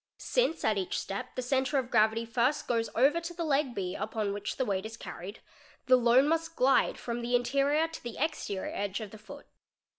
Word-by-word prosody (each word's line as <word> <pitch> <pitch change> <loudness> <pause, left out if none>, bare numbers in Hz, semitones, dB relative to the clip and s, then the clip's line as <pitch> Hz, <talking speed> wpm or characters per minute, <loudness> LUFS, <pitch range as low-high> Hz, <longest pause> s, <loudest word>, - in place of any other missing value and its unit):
Since - - 0
at 215 -2 +2
each 185 - -2
step 250 +6 -5
the 255 - -2
centre 265 +2 +1
of 255 -2 -2
gravity 220 +2 +3
first 240 +5 0
goes 230 -2 0
over 280 +8 +4
to 340 +1 -6
the 340 - -3
leg 280 -4 +1
&B 185 -2 -3
upon 215 -2 -2
which 205 0 -4
the 260 - 0
weight 195 -4 -1
is 220 +1 -7
carried, 195 +1 -8 0.4
the 255 0 +6
load 245 +2 +5
must 330 +1 0
glide 265 +2 +3
from 240 0 -4
the 240 +1 0
interior 280 +5 +2
to 325 - -9
the 240 -2 -7
exterior 280 -10 -2
edge 200 +1 -2
of 215 -3 -7
the 220 - -11
foot. 285 +7 -11
245 Hz, 210 wpm, -30 LUFS, 220-285 Hz, 0.4 s, the